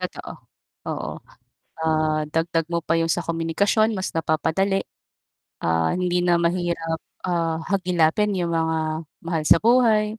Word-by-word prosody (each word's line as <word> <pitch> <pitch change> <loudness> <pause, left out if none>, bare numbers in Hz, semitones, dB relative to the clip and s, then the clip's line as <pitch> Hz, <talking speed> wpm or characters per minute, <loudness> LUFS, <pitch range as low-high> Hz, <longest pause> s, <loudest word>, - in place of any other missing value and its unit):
Totoo, - - -6 0.6
oo. - - -3 0.7
Ah, 155 -1 +1
dagdag 165 0 0
mo 170 - +1
pa 165 - +1
yung 165 0 +1
sa 175 - 0
komunikasyon, 200 +7 +1
mas 185 - -4
napapadali. 165 +5 0 0.8
Ah, 80 0 +1
hindi 180 -1 +1
na 175 -1 +3
mahirap, 170 -1 -1 0.3
ah, 165 -2 -1
hagilapin 185 +1 +2
yung 170 -2 -1
mga 160 0 +1 0.5
mahal 165 -2 -2
sa - - +8
buhay. 220 -2 +3
170 Hz, 130 wpm, -23 LUFS, 160-185 Hz, 0.8 s, sa